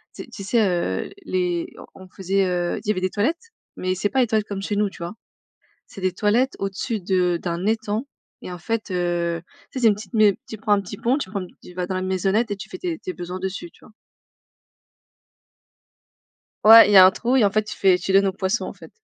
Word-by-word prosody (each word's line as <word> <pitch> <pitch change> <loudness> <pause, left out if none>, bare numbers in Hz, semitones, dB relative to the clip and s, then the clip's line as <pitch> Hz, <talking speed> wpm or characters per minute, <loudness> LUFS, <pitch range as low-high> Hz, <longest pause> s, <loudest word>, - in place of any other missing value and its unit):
tu - - -7
sais - - -17
tu 200 - -8
sais, 215 +1 +2
heu, 170 - -1 0.2
les 180 -2 -2 0.2
on 190 - -13
on - - -19
faisait, 195 +1 0
heu, 175 -1 -1
il - - -12
y - - +3
avait 185 -3 -2
des 185 - 0
toilettes, 320 - -2 0.3
mais 185 0 -1
c'est 200 +3 -1
pas 265 - 0
les 245 - +2
toilettes 215 -1 0
comme 200 -1 -5
chez 205 +1 -3
nous, 205 0 +1
tu 175 -2 -10
vois? 170 - -5 0.7
C'est - - -11
des 185 -1 0
toilettes 220 +8 +1
au-dessus 195 +3 -3
de 180 -1 +1
d'un 170 0 -3
étang 220 +2 -1 0.4
et - - -7
en 180 - -7
fait, 225 +3 -3
heu, 175 -2 -1 0.3
tu - - -6
sais, - - -4
c'est 235 - +5
une 210 - +4
petite 205 0 -11
mai 215 -3 +4
tu 220 - -6
prends 210 0 0
un 205 - +4
petit 180 - -8
pont, 245 +3 +1
tu 230 - -5
prends 200 -2 -3 0.2
tu 180 - -13
vas 180 0 -3
dans 185 - -4
la 185 - -2
maisonnette 190 +4 0
et 205 - -2
tu 195 - -9
fais 370 - -8
tes 345 -3 -3
tes 185 - -6
besoins 180 +1 -6
dessus, 190 -2 -5
tu - - -22
vois? - - -18 2.7
Ouais, 225 0 +9
y 205 - +6
a 185 - +11
un 185 - +6
trou 240 +6 -1
et 230 - +5
en 200 - +2
fait 215 +1 +1
tu 215 - -7
fais 190 -2 +4
tu 190 - -3
donnes 195 +1 +5
aux 190 - -1
poissons 190 +4 -1
en - - -6
fait. - - -15
195 Hz, 250 wpm, -22 LUFS, 185-215 Hz, 2.7 s, a